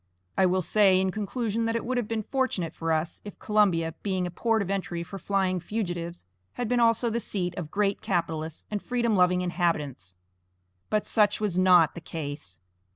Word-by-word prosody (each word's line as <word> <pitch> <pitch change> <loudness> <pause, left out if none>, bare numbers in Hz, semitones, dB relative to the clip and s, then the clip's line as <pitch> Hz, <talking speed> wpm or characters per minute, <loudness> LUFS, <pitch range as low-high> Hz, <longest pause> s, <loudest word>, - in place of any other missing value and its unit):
I 190 - +4
will 185 +1 +1
say 195 0 +4
in 190 0 +1
conclusion 225 +2 -2
that 225 0 0
it 230 - -2
would 255 +1 -1
have 230 - -3
been 220 -1 -2
fortunate 255 - -1
for 165 0 -2
us 160 +1 -1
if 205 - -9
Columbia, 185 -7 +2
being 185 -3 -1
a 175 - -4
port 225 +4 +1
of 195 - -4
entry 175 -3 -2
for 195 +3 -8
flying 190 -2 0
fugitives, 175 - -4 0.3
had 245 - -3
been 245 +1 +1
also 230 0 +3
the 235 - 0
seat 180 -6 -3
of 160 -4 -5
great 200 +2 0
capitalists 160 -3 -2
and 205 -1 -2
freedom 235 -3 0
loving 180 -1 +4
inhabitants; 150 - -2 0.7
but 215 -1 +1
such 210 -1 +2
was 200 -4 0
not 180 -4 +6
the 170 - -8
case. 145 - -6
185 Hz, 190 wpm, -27 LUFS, 170-215 Hz, 0.7 s, not